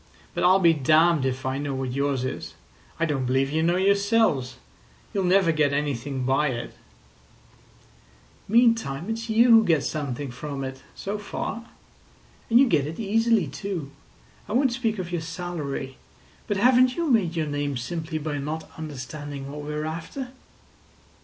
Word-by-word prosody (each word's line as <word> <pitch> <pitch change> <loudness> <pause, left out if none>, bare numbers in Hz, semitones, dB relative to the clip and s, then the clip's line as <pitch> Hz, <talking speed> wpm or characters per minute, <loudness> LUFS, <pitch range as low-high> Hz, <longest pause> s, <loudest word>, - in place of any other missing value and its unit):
But - - -2
I'll 185 +2 +6
be 170 -3 +5
damned 155 0 +3
if 130 0 -3
I 130 +1 -1
know 140 -1 -3
what 130 -1 -3
yours 140 -1 0
is. 130 - -5 0.4
I 165 - +2
don't 135 -5 -1
believe 135 +2 +1
you 160 +1 +1
know 170 +2 +2
yourselves. 200 - +2 0.6
You'll 195 -2 0
never 185 -1 +4
get 150 -3 +2
anything 140 -2 -2
by 135 +4 +2
it." 120 -3 -4 1.7
"Meantime 225 - +2
it's 225 +1 -4
you 230 +2 +5
who 225 -1 +8
get 165 -8 +2
something 140 -3 -3
from 140 +2 -5
it—so 135 +10 -6
far. 230 +2 -5 0.8
And 235 +1 +6
you 275 - +6
get 150 - +2
it 160 - -7
easily, 225 -1 +2
too. 155 0 -5 0.6
I - - -3
won't 260 0 +3
speak 230 -3 -1
of 180 -2 -5
your 175 -2 -1
salary, 160 -6 -5 0.5
but 205 - 0
haven't 250 +3 +5
you 340 -1 -1
made 185 -8 +2
your 160 -2 0
name 145 -2 -2
simply 160 +6 -4
by 150 -1 -3
not 155 +3 -5
understanding 145 -1 -6
what 150 +1 -6
we 145 +1 -6
are 150 0 -3
after?" 170 - -5
155 Hz, 160 wpm, -25 LUFS, 140-200 Hz, 1.7 s, who